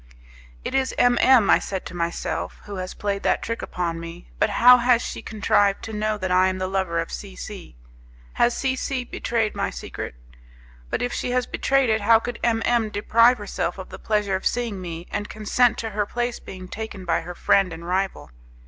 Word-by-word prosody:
It -, -, -3 dB
is 265 Hz, -1 st, 0 dB
M 245 Hz, -1 st, +4 dB
M, 255 Hz, -6 st, +6 dB
I -, -, +6 dB
said 190 Hz, -2 st, -5 dB
to -, -, -8 dB
myself, 170 Hz, 0 st, -3 dB
who 205 Hz, -2 st, -7 dB
has 185 Hz, 0 st, -5 dB
played 200 Hz, -1 st, -2 dB
that -, -, +1 dB
trick 230 Hz, 0 st, -3 dB
upon 170 Hz, -2 st, -3 dB
me, 170 Hz, +1 st, -10 dB
but -, -, +3 dB
how 245 Hz, +4 st, +7 dB
has 245 Hz, -1 st, +4 dB
she -, -, -5 dB
contrived 205 Hz, -2 st, +1 dB
to 220 Hz, -, -6 dB
know 215 Hz, 0 st, -1 dB
that 185 Hz, -2 st, -3 dB
I 185 Hz, +1 st, +5 dB
am 185 Hz, 0 st, -1 dB
the 185 Hz, -, -2 dB
lover 190 Hz, -3 st, -1 dB
of 165 Hz, -, -3 dB
C 195 Hz, -2 st, -7 dB
C? 195 Hz, -, -9 dB, 0.6 s
Has 240 Hz, -, +2 dB
C 265 Hz, -1 st, 0 dB
C 260 Hz, -1 st, -2 dB
betrayed 230 Hz, -2 st, -1 dB
my -, -, -1 dB
secret? -, -, -7 dB, 0.7 s
But -, -, -1 dB
if 245 Hz, -, -2 dB
she -, -, -2 dB
has 250 Hz, 0 st, +1 dB
betrayed 270 Hz, -3 st, +1 dB
it, 220 Hz, 0 st, +1 dB
how 225 Hz, +2 st, +6 dB
could 240 Hz, +1 st, -5 dB
M 225 Hz, -1 st, +2 dB
M 235 Hz, -3 st, +2 dB
deprive 230 Hz, +4 st, +4 dB
herself 205 Hz, -1 st, -3 dB
of 190 Hz, -, -8 dB
the -, -, -9 dB
pleasure 210 Hz, -2 st, 0 dB
of 190 Hz, -, 0 dB
seeing 230 Hz, -5 st, -2 dB
me, 170 Hz, -1 st, -6 dB
and 205 Hz, -, -3 dB
consent 225 Hz, +3 st, +2 dB
to 225 Hz, -1 st, -4 dB
her 205 Hz, 0 st, -1 dB
place 240 Hz, +1 st, -2 dB
being 185 Hz, -1 st, -9 dB
taken 205 Hz, -2 st, -7 dB
by 170 Hz, -, +1 dB
her 175 Hz, +1 st, -8 dB
friend 195 Hz, 0 st, +3 dB
and 165 Hz, +1 st, -8 dB
rival? 185 Hz, -, -2 dB
210 Hz, 210 wpm, -23 LUFS, 185-235 Hz, 0.7 s, how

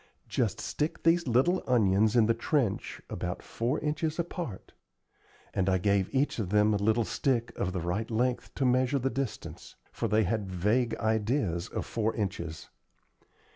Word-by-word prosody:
Just -, -, 0 dB
stick 150 Hz, +2 st, -3 dB
these 165 Hz, -1 st, +3 dB
little 130 Hz, +10 st, +3 dB
onions 110 Hz, -2 st, +3 dB
in 115 Hz, -2 st, +6 dB
the 115 Hz, -, +3 dB
trench 115 Hz, -2 st, -1 dB
about -, -, -4 dB
four 120 Hz, +6 st, -1 dB
inches 155 Hz, +1 st, -1 dB
apart;" 170 Hz, -, -5 dB, 0.8 s
and 95 Hz, -1 st, +1 dB
I 95 Hz, -, +3 dB
gave 100 Hz, 0 st, +1 dB
each 135 Hz, -2 st, +1 dB
of 100 Hz, -5 st, -2 dB
them 105 Hz, +1 st, +4 dB
a -, -, +2 dB
little 110 Hz, +3 st, +2 dB
stick 120 Hz, +4 st, 0 dB
of 90 Hz, -, -1 dB
the 90 Hz, -2 st, -3 dB
right 90 Hz, +6 st, -2 dB
length 120 Hz, +2 st, 0 dB
to 135 Hz, -, 0 dB
measure 130 Hz, +2 st, +3 dB
the 135 Hz, 0 st, 0 dB
distance; 130 Hz, -1 st, -5 dB, 0.2 s
for -, -, -2 dB
they 110 Hz, +1 st, +3 dB
had 105 Hz, 0 st, -1 dB
vague 115 Hz, +6 st, +1 dB
ideas 110 Hz, -, 0 dB
of -, -, -4 dB
four 110 Hz, -1 st, -1 dB
inches. 85 Hz, -6 st, -4 dB
115 Hz, 165 wpm, -29 LUFS, 100-130 Hz, 0.8 s, in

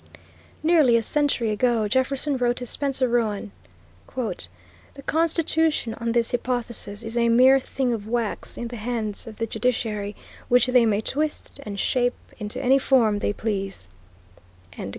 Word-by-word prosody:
Nearly 310 Hz, -8 st, +5 dB
a 230 Hz, -, 0 dB
century 275 Hz, -4 st, +1 dB
ago, 225 Hz, 0 st, +1 dB
Jefferson 265 Hz, +5 st, +1 dB
wrote 245 Hz, -1 st, +1 dB
to 245 Hz, -, -5 dB
Spencer 265 Hz, +1 st, -1 dB
Roane, 220 Hz, -, -1 dB, 0.6 s
"The 260 Hz, +2 st, -7 dB
Constitution, 320 Hz, -5 st, +1 dB
on 230 Hz, 0 st, -3 dB
this 235 Hz, -1 st, +1 dB
hypothesis, 235 Hz, -4 st, -2 dB
is 225 Hz, +1 st, -6 dB
a 235 Hz, 0 st, +3 dB
mere 255 Hz, +3 st, +6 dB
thing 260 Hz, -1 st, -2 dB
of 215 Hz, -2 st, -5 dB
wax 230 Hz, -2 st, -3 dB
in 240 Hz, -, -4 dB
the 240 Hz, -, -7 dB
hands 220 Hz, -1 st, -3 dB
of 220 Hz, -, -8 dB
the 225 Hz, -, -2 dB
judiciary, 220 Hz, -3 st, -2 dB, 0.3 s
which 245 Hz, -1 st, +5 dB
they 250 Hz, -2 st, +4 dB
may 210 Hz, -1 st, +1 dB
twist 300 Hz, +3 st, -2 dB
and 205 Hz, -5 st, -6 dB
shape 245 Hz, +2 st, +1 dB, 0.2 s
into 210 Hz, -1 st, -5 dB
any 265 Hz, +2 st, +4 dB
form 230 Hz, -6 st, +3 dB
they -, -, 0 dB
please." 195 Hz, -, -4 dB
240 Hz, 150 wpm, -24 LUFS, 220-260 Hz, 0.6 s, mere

